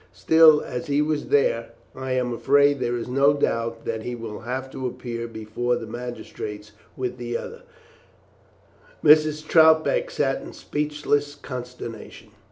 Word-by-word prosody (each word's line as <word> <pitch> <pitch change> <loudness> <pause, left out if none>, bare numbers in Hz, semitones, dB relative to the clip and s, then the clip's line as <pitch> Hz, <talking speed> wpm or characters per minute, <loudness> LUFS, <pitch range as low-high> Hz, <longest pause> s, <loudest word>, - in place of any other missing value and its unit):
Still, 160 -2 +6
as 125 +7 -5
he 145 0 +1
was 150 0 0
there, 445 +4 +1 0.2
I 130 0 -4
am 125 -1 0
afraid 140 +4 +3
there 120 -1 -1
is 115 - -5
no 135 +3 +3
doubt 115 -4 -1
that 110 -1 -3
he 125 +2 -5
will 115 -3 -7
have 130 +3 -4
to 130 -1 -4
appear 120 -1 -5
before 115 +2 -2
the 115 - -5
magistrates 110 -3 -7 0.3
with 125 -1 -4
the 120 -1 -3
others." 470 +1 -9 1.4
Mrs. 155 0 +4
Troutbeck 160 - +4
sat - - -1
in - - -10
speechless 145 -1 -2
consternation. 125 -5 -8
130 Hz, 145 wpm, -24 LUFS, 120-150 Hz, 1.4 s, Still